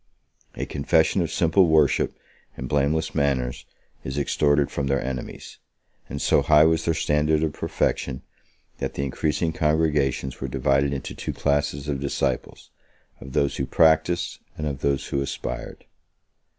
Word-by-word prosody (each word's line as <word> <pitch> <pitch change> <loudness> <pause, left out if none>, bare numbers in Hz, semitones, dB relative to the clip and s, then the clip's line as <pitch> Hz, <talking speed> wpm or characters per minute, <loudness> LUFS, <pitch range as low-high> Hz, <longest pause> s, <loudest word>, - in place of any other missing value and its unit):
A - - -3
confession - - +2
of - - -2
simple 85 +3 +3
worship 80 -3 +2 0.4
and 65 - -5
blameless 75 +4 0
manners 70 -4 -1 0.4
is 65 +2 -5
extorted 75 0 +2
from 70 - -2
their 70 0 +1
enemies; 65 -1 -6 0.5
and 70 - -5
so - - +3
high 75 +1 +5
was 80 0 +2
their 80 - +1
standard 75 0 +1
of 80 -2 -1
perfection, 65 -2 -2 0.6
that - - -3
the 70 - -2
increasing 75 +4 -1
congregations 75 -5 0
were 65 - -2
divided 70 +2 +1
into 70 -3 -4
two - - -5
classes 70 0 -1
of 70 -2 -2
disciples, 70 - -3 0.5
of 65 -1 -10
those 70 0 +1
who 65 - -2
practised, 80 +2 +2 0.2
and 75 - -3
of 70 -3 -3
those 70 -1 0
who 70 - -1
aspired. 70 - -5
70 Hz, 150 wpm, -24 LUFS, 70-80 Hz, 0.6 s, high